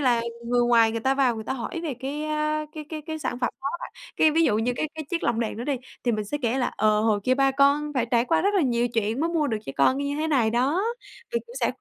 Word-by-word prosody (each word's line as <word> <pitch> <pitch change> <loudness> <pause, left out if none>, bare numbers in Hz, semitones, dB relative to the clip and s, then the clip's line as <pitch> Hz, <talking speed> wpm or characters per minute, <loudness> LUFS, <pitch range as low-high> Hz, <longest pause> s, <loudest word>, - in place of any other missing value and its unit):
là 245 -4 +3 0.2
người 245 +1 +1
ngoài 230 -2 +5
người 230 - -2
ta 265 +4 +2
vào 265 -3 +2
người 220 -1 -6
ta - - -2
hỏi 270 +6 -4
về 310 -5 -3
cái, 285 +3 -3
a, 305 0 -1
cái 310 -1 -7
cái 310 -1 -6
cái 315 -1 -4
sản 245 -5 -3
phẩm 245 - +1
đó 275 - -2
á - - -2
bạn, - - -11 0.2
cái, 315 - +5
ví 325 +2 +3
dụ 215 -9 +3
như 235 +3 0
cái 310 - 0
cái - - -13
cái 315 -1 -5
chiếc 345 -2 -1
lồng 235 -1 +1
đèn 225 -2 -2
đó 235 - -5
đi, 285 -2 0 0.3
thì 240 - +2
mình 215 -1 -1
sẽ 290 +9 -3
kể 240 +2 +1
là, 250 - +1
ờ, 215 0 +3
"Hồi 215 -2 +2
kia 255 - +3
ba 270 0 +3
con 280 +2 +3
phải 245 -3 +1
trải 235 -1 +3
qua 325 +5 +2
rất 400 +2 +1
là 385 - +3
nhiều 240 -3 +1
chuyện 225 +1 -1
mới 330 +2 +1
mua 320 -3 +1
được 225 -5 -1
cho - - -4
con 260 - +3
như 285 0 -2
thế 310 +1 -1
này 245 -7 +2
đó." 265 - +1 0.5
Mình 470 - 0
cũng 475 - -13
sẽ - - +2
265 Hz, 310 wpm, -25 LUFS, 235-305 Hz, 0.5 s, ngoài